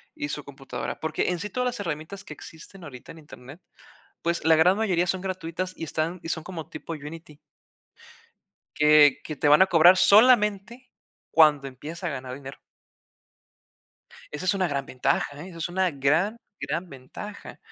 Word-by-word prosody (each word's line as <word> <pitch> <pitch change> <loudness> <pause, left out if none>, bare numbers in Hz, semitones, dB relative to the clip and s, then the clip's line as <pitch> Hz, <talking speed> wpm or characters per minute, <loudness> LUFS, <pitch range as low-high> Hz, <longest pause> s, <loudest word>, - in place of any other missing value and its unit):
y 145 - -4
su 150 -1 -4
computadora 135 -1 -7
porque, 160 +2 -1
en 175 -2 -2
sí, 210 +3 -5
todas 250 +4 -2
las 245 -3 -2
herramientas 165 +2 -5
que - - -9
existen 165 +5 -12
ahorita 130 -6 -11
en 165 - -13
internet, 145 +1 -13 0.6
pues 170 0 -1
la 160 - +6
gran 180 +5 +4
mayoría 180 -5 +1
son 185 +1 -1
gratuitas 185 -1 -4
y - - -8
están 165 +3 -3
y 165 - -6
son 160 -2 -2
como 175 -4 -8
tipo 165 - -7
Unity 150 0 -10 1.4
que 150 -2 +5
que 155 - -6
te 145 - +1
van 150 +5 +7
a - - +6
cobrar 175 +2 +7
solamente 215 +2 +4 0.4
cuando 150 -3 +4
empiezas 155 +7 -9
a 170 - -1
ganar 130 -2 -6
dinero. 135 0 -10 1.7
Esa 150 +5 -5
es 185 - +3
una 190 -2 +1
gran 140 -1 -3
ventaja, 140 +3 -1
¿eh? 185 - -10
Eso 170 - -11
es 165 - -2
una 185 0 0
gran, 155 +10 +1 0.2
gran 175 +2 -3
ventaja. 140 +10 -10
165 Hz, 175 wpm, -25 LUFS, 150-185 Hz, 1.7 s, van